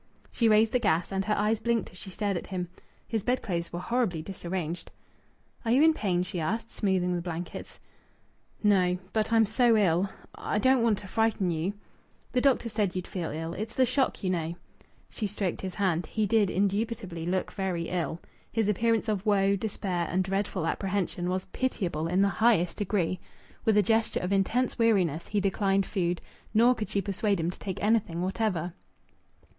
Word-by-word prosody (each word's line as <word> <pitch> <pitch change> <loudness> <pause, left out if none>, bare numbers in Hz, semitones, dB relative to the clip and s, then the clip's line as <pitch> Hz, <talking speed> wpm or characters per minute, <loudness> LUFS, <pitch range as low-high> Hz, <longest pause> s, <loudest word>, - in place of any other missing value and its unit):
She 230 -2 +2
raised 215 +1 +5
the 250 - +2
gas, 170 -5 +1
and 195 0 0
her 210 - +1
eyes 210 +1 +2
blinked 235 -3 0
as 180 - -14
she - - -8
stared 200 +1 -1
at 175 - -4
him. 180 -3 -3 0.4
His 225 -2 -1
bedclothes 190 -7 -1
were 175 - -4
horribly 205 -6 0
disarranged. 175 -2 -4 0.7
"Are 230 - -2
you 260 +6 +5
in 320 0 +6
pain?" 185 - 0
she 185 -1 -4
asked, 225 +8 -2
smoothing 185 -3 +1
the 175 - -2
blankets. 175 0 -6 0.8
"No. 185 -3 +4 0.2
But 220 0 0
I'm 225 -1 +5
so 225 +2 +3
ill. 190 -1 +3 0.2
I - - -3
I - - +3
don't 260 +3 +4
want 225 -3 +3
to 200 - -9
frighten 220 -3 +1
you 165 +4 -1 0.3
" - - -36
"The 250 - +2
doctor 265 -3 +3
said 210 -4 -1
you'd 180 -1 -2
feel 175 -4 -4
ill. 165 +2 -4
It's 220 +3 -5
the 260 - +4
shock, 255 -2 0
you 185 - +1
know." 170 -1 -2 0.5
She 215 - -3
stroked 195 -3 -3
his 190 -2 -5
hand. 180 -4 0
He 215 -1 0
did 205 -1 +3
indubitably 200 -3 -1
look 185 +1 -1
very 185 -4 -2
ill. 170 -2 -2 0.3
His 225 -3 +1
appearance 225 +2 +1
of 205 -3 0
woe, 200 -2 +3
despair, 190 -4 -2
and 185 +2 +1
dreadful 195 -2 -1
apprehension 185 -1 -1
was 185 +1 -1
pitiable 180 -11 -1
in 185 +3 +3
the - - +4
highest 210 -7 +3
degree. 185 -3 0 0.5
With 220 -2 +4
a 210 - +6
gesture 225 +3 +1
of 180 +2 -1
intense 235 +7 +1
weariness 185 -9 +2
he 210 - 0
declined 195 0 +1
food, 175 -3 -1 0.3
nor 235 +3 +6
could 220 -3 -5
she 200 - 0
persuade 200 0 0
him 165 +2 0
to - - -14
take 190 -2 -5
anything 205 -6 +1
whatever. 185 -3 -1
195 Hz, 190 wpm, -28 LUFS, 180-220 Hz, 0.8 s, in